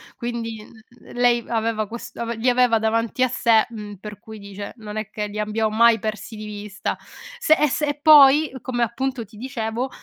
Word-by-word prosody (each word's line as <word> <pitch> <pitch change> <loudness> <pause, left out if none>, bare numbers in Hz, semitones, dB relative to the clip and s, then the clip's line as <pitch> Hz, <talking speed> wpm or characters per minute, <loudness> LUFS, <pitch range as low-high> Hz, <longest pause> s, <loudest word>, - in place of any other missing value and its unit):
quindi 230 -2 -5
n - - -17
l 230 +2 -19
lei 240 -1 +3
aveva 225 -2 -1
ques 235 +3 -9
ave 235 0 -4
li 230 +3 +1
aveva 245 -2 +3
davanti 230 +3 0
a - - +4
sé, 230 -3 +3
mhm, 210 -3 -8
per 210 +1 -9
cui, 220 -1 -11
dice 200 0 -8
non 210 -2 -8
è 215 -1 -4
che 210 -1 -4
li 210 +1 -6
abbiam 215 +1 -1
mai 235 0 +5
persi 215 +2 -5
di 215 - -7
vista. 205 -1 -5 0.4
Se 480 -10 +4
e 300 - +4
se 295 +2 -1
e 290 0 -3
poi, 295 -1 +7
come 240 -2 -1
appunto 250 +1 -2
ti 215 +2 -19
dicevo, 240 0 -3
230 Hz, 205 wpm, -22 LUFS, 215-245 Hz, 0.4 s, poi